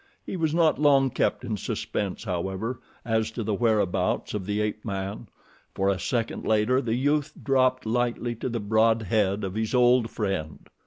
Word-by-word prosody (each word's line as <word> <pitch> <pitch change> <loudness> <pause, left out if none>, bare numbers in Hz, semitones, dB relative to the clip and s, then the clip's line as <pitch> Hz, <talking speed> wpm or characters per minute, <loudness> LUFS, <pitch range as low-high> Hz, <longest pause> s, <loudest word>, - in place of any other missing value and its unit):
He - - -5
was 160 -4 0
not 160 -2 +3
long 135 -3 +4
kept 125 - 0
in 110 -3 -2
suspense, 100 0 -3
however, 95 +5 -3 0.3
as 110 -1 +1
to 115 0 -5
the 105 0 -1
whereabouts 105 -4 +1
of 100 -3 -4
the 105 0 -1
ape 105 0 -2
man, 100 +2 -4 0.5
for 95 +1 +1
a 95 -2 0
second 115 +5 -2
later 110 +4 +2
the 115 -2 -1
youth 145 +3 +1
dropped 130 -2 +2
lightly 120 +1 0
to 125 - -3
the 120 -1 -2
broad 110 +2 +2
head 100 0 +1
of 95 -1 -3
his 110 +3 -1
old 125 -1 +4
friend. 95 -9 -3
110 Hz, 175 wpm, -26 LUFS, 105-125 Hz, 0.5 s, long